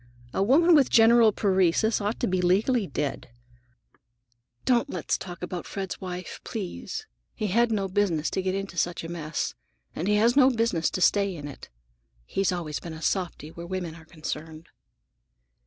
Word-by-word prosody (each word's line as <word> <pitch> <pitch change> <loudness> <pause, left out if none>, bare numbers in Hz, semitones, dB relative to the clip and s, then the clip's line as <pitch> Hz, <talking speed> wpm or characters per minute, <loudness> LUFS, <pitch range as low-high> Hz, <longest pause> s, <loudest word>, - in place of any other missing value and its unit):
A - - 0
woman 310 - +5
with 285 -5 +5
general 230 -1 +6
paresis 195 +2 +2
ought 205 +3 -2
to - - +1
be 185 -1 0
legally 200 +5 +2
dead." 140 -2 -3 1.4
"Don't 255 +3 +2
let - - -6
us - - +5
talk 175 -1 -7
about 180 -1 -5
Fred's 195 -2 -5
wife, 180 -1 -6
please. 220 - -5 0.3
He 215 - -3
had 235 +4 +3
no 200 -3 0
business 185 -5 0
to 190 - -1
get 185 0 -1
into 195 -4 -3
such 175 +1 -1
a 165 - -6
mess, 165 -2 -3 0.4
and 170 - -2
he 210 - +3
had 230 +4 +4
no 265 -2 +7
business 230 -9 +1
to 185 - -4
stay 200 0 +3
in 145 -3 -7
it. 145 - -10 0.6
He's 195 - 0
always 165 -5 -3
been 170 - -8
a 160 - -9
softy 175 -5 -2
where 170 +1 -9
women 180 -3 -4
were 165 -1 -14
concerned." 155 0 -7
185 Hz, 175 wpm, -26 LUFS, 170-220 Hz, 1.4 s, no